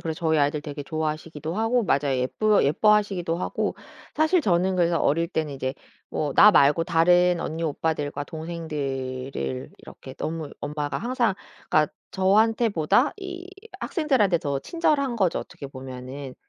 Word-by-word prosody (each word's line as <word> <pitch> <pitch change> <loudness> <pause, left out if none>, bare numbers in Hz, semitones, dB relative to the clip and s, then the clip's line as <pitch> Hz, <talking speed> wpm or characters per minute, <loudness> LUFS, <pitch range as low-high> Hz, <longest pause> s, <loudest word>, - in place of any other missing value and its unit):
그래 160 -1 -3
저희 160 -1 +1
아이들 145 +1 +1
되게 145 -1 -6
좋아하시기도 155 +1 -4
하고 225 +4 +1
맞아요 140 -5 +1
예뻐 205 +12 +2
예뻐하시기도 190 +1 +2
하고. 180 - -2 0.4
사실 315 +4 +3
저는 185 - +1
그래서 170 -1 +2
어릴 165 +4 +1
때는 155 -4 -2
이제 130 0 -3 0.3
뭐 150 -2 -2
나 210 - +9
말고 150 -1 +4
다른 175 +1 +3
언니 160 +2 -4
오빠들과 145 -2 -2
동생들을 135 - -4
이렇게 130 - -12
너무 160 0 -4
엄마가 145 0 -3
항상 240 -4 0 0.3
그러니까 155 -1 +2 0.2
저한테보다 215 - +3
이 370 -2 -7 0.3
학생들한테 260 - +1
더 140 -4 -2
친절한 290 -7 0
거죠 190 -6 +1
어떻게 140 - -9
보면은. 130 0 -8
165 Hz, 350 characters per minute, -25 LUFS, 145-205 Hz, 0.4 s, 나